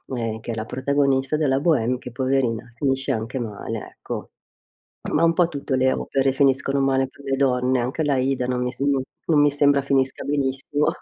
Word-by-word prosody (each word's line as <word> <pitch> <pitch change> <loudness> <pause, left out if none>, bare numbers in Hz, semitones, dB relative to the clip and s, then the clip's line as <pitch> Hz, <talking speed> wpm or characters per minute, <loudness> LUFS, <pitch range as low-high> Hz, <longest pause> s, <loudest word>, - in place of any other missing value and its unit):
ehm, 115 -2 -3
che 120 - -5
è - - -3
la 110 0 -4
protagonista 135 +2 +1
della 135 -3 +2
Bohème 130 -6 +2
che 125 0 -9
poverina 125 -2 -1
finisce 135 +1 0
anche 115 +3 -3
male, 110 -4 -5 0.2
ecco. - - -6 0.8
Ma 155 - +3
un 165 0 +4
po' 175 0 +3
tutte 140 -4 -3
le 130 0 +3
opere 135 -1 0
finiscono 135 0 +2
male 135 -1 +2
per 140 - -17
le 135 -1 0
donne, 130 -1 +2
anche 130 +6 -1
l'Aida 135 -3 +1
non 125 0 -1
mi 125 - -2
sem 140 +2 -1 0.4
non 150 -3 +5
mi 145 0 +4
sembra 145 0 +3
finisca 135 -1 0
benissimo. 140 +1 -1
135 Hz, 185 wpm, -23 LUFS, 125-140 Hz, 0.8 s, non